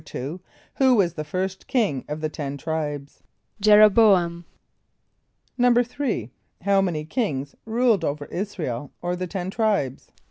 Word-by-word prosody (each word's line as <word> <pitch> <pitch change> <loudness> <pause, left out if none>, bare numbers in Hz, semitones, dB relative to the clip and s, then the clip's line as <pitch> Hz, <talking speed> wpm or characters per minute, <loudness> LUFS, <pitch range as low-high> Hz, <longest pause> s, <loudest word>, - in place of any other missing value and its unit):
= - - -16
Who 145 +8 -5 0.6
was 180 -6 +2
the 155 - -4
first 190 +4 -4
king 205 - 0
of 150 +1 -4
the 155 - 0
Ten 145 -2 -5
Tribes? 145 -2 -4 0.4
=J[)e]r 210 +1 +7
o - - +10
b[=o]´am.= 185 -6 +3 1.1
=3.= 245 - +1 0.3
How 200 0 +3
many 165 -5 -2
kings 145 - -2
ruled 230 -2 +2
over 145 0 -2
[)I][s+]´ra 195 -3 -3
el 125 +3 -4
or 175 0 -1
the 185 0 -4
Ten 185 0 -4
Tribes? 200 - -1
180 Hz, 145 wpm, -24 LUFS, 150-210 Hz, 1.1 s, o